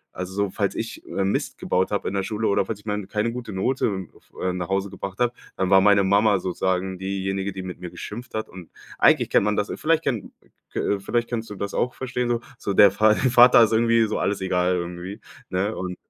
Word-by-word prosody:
also 90 0 -5
so 100 -1 0
falls - - -1
ich, - - -5
äh, 100 - -2
Mist 95 - -1
gebaut 95 +1 0
habe 100 - -2
in - - -3
der 100 - 0
Schule 105 +3 -2
oder 100 -1 +2
falls 110 - -3
ich 105 - -21
mal 105 -1 -2
keine 110 +2 -1
gute 120 -2 -6
Note 95 -2 -1
f - - -24
äh, 90 -1 0
nach 90 -1 -4
Hause 95 0 -1
gebracht 95 0 -7
habe, 120 0 +2 0.2
dann 95 0 -1
war 95 0 +7
meine 100 0 +5
Mama 100 +1 +4
sozusagen 95 0 -2
diejenige, 95 0 -2
die 95 -1 -7
mit 90 -1 -7
mir 90 - -7
geschimpft 120 +8 -8
hat 110 - -2
und 90 -3 -12 0.3
eigentlich - - +4
kennt - - +4
man 105 0 +1
das 105 - -1
vielleicht 165 +1 +1
kennt 115 -6 -2 0.4
k - - -3
äh, 100 - 0
vielleicht 120 +4 -1
kannst 115 -2 -4
du 105 - -7
das 100 +1 -4
auch 125 - -1
verstehen 125 -1 -2
so. 120 -1 0 0.2
So, 100 - -2
der 100 0 +7
Va 110 0 +5
Vater 125 -1 +6
ist 115 - +2
irgendwie 115 0 +4
so 105 - -2
alles 100 0 0
egal 90 -1 +1
irgendwie, 90 +3 -5 0.3
ne, 100 +4 -1
und 90 -1 -5
100 Hz, 235 wpm, -24 LUFS, 95-110 Hz, 0.4 s, war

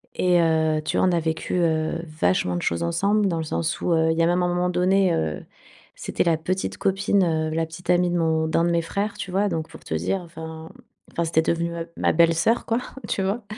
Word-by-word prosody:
Et 180 -1 +3
heu, 160 -1 +2
tu 155 - -2
vois, - - +3
on - - +3
a 170 - +2
vécu, 160 +2 -2
heu, 160 0 0 0.2
vachement 90 0 +1
de 85 - -2
choses 85 0 -1
ensemble, 200 - +1
dans 170 -3 -1
le 160 - -2
sens 165 +2 -2
où, - - 0
heu, 160 0 +3
il 160 - -1
y 165 - +3
a 165 - +3
un 175 - +2
moment 180 0 +1
donné, 185 +1 +2
heu, 80 - -2 0.5
c'était - - -2
la 165 -2 +2
petite 185 +4 -3
copine, 195 0 +1
heu, 160 -2 0
la 165 - +1
petite 165 +2 -12
amie 180 0 +3
de 175 - 0
mon 160 -1 +1
d'un 160 +1 +1
de 170 - +1
mes 170 0 +2
frères, 200 +5 -2
tu 185 - -6
vois? 200 +2 +1
Donc 160 -3 -3
pour - - -13
te - - -5
dire, 85 - -1
enfin, 160 -1 -9
mmh, - - -17 0.3
enfin 170 - -1
c'était 160 0 +2
devenue, 170 +1 -1
heu, 165 0 -5
ma - - +2
belle 165 0 +4
sœur 225 +8 +1
quoi, 230 +1 0 0.3
tu - - -1
vois? 200 +5 -1
170 Hz, 250 wpm, -24 LUFS, 160-180 Hz, 0.5 s, belle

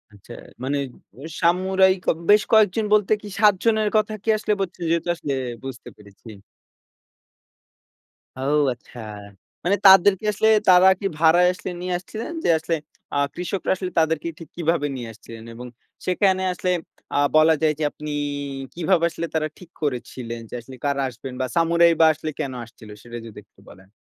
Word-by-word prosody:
আচ্ছা। 105 +4 -13 0.3
মানে 140 +2 -1 0.4
ও - - -11 0.2
সামুরাই 185 +2 +3
কেব - - +1
বেশ 210 0 +6
কয়েকজন 215 0 +4
বলতে 210 -2 +3
কি 210 - -9
৭ 210 -1 +6
জনের 220 -2 +2
কথা 215 0 0
কি - - -3
আসলে 210 0 0
বলছেন 180 -2 -4
যেহেতু 170 +1 0
আসলে 145 -4 -4 0.3
বুঝতে 135 -3 -8
পেরেছি। 100 +2 -16 2.1
ও - - -6 0.3
আচ্ছা। 120 0 -15 0.7
মানে 190 +3 +3
তাদেরকে 195 +1 +7
আসলে 210 +1 +1 0.2
তারা 180 +1 +7
কি - - -6
ভাড়ায় 170 +2 +5
আসলে 185 - -7
নিয়ে 180 0 -2
আসছিলেন। 215 - -7
যে - - +1
আসলে 165 +1 -2 0.4
আ - - +1 0.2
কৃষকরা 180 +2 -3
আসলে 185 -1 -5
তাদেরকে 160 0 0
ঠিক 165 - -11
কিভাবে 165 -3 0
নিয়ে 120 -3 -6
আসছিলেন 115 0 -12
এবং 125 +2 -9 0.4
সেখানে 190 0 +2
আসলে 180 +1 -3 0.5
আ - - +3 0.2
বলা 155 +1 +6
যায় 155 -1 +3
যে - - -1
আপনি 150 0 -8 0.6
কিভাবে 170 0 +1
আসলে 170 0 -5
তারা 155 -1 +1
ঠিক 180 - -14
করেছিলেন 125 -4 -4
যে - - -14
আসলে 130 +3 -12
কারা 140 -1 0
আসবেন 130 +1 -9
বা - - +1
সামুরাই 170 0 +4
বা 165 - +7
আসলে 155 +1 -6
কেন 135 - -3
আসছিল? 115 -2 -15
সেটা 120 0 -8
যদি 115 - -12
একটু 105 - -30
বলেন। 95 -1 -17
170 Hz, 165 wpm, -22 LUFS, 135-190 Hz, 2.1 s, তাদেরকে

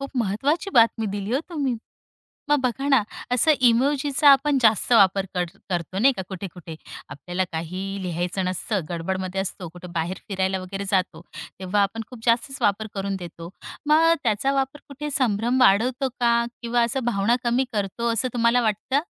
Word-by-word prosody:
खूप 275 - -6
महत्वाची 270 - 0
बातमी 230 -1 +4
दिली 200 +2 -4
हो 275 - +1
तुम्ही. 275 -7 -1 0.7
मग 295 0 +4
बघा 270 +3 -1
ना, 265 -6 +5 0.3
असं 280 +6 +4 0.2
इमोजीचा 280 +4 +2
आपण 275 +1 +4
जास्त 220 +2 +3
वापर 195 -3 +5
कर 180 0 +1 0.3
करतो 175 +2 -2
नाही 270 +5 +5
का 190 - -3
कुठे-कुठे, 180 -3 -8 0.3
आपल्याला 180 +5 -3
काहीही 185 +4 -4
लिहायचं 180 +2 -2
नसतं 185 +3 -1
गडबड 175 +2 -2
मध्ये 185 +1 -3
असतो, 185 -2 -4
कुठे 175 +2 -11
बाहेर 170 +3 -2
फिरायला 190 -1 -1
वगैरे 195 +2 -5
जातो, 190 -2 0 0.4
तेव्हा 195 +2 +1
आपण 225 +3 -2
खूप 250 - -10
जास्तच 235 +4 +1
वापर 205 +2 +1
करून 195 0 -2
देतो. 170 -1 -9 0.4
मग 325 +2 +5
त्याचा 235 +4 +1
वापर 270 +1 -2
कुठे 295 +2 -6
संभ्रम 245 -2 +1
वाढवतो 250 +5 +3
का? 235 0 +3 0.2
किंवा 235 0 +1
असं 235 +3 0
भावना 230 +1 +2
कमी 240 +2 +2
करतो 215 +3 -1
असं 240 +3 0
तुम्हाला 235 +1 +3
वाटतं? 220 +6 0
220 Hz, 165 wpm, -24 LUFS, 190-260 Hz, 0.7 s, ना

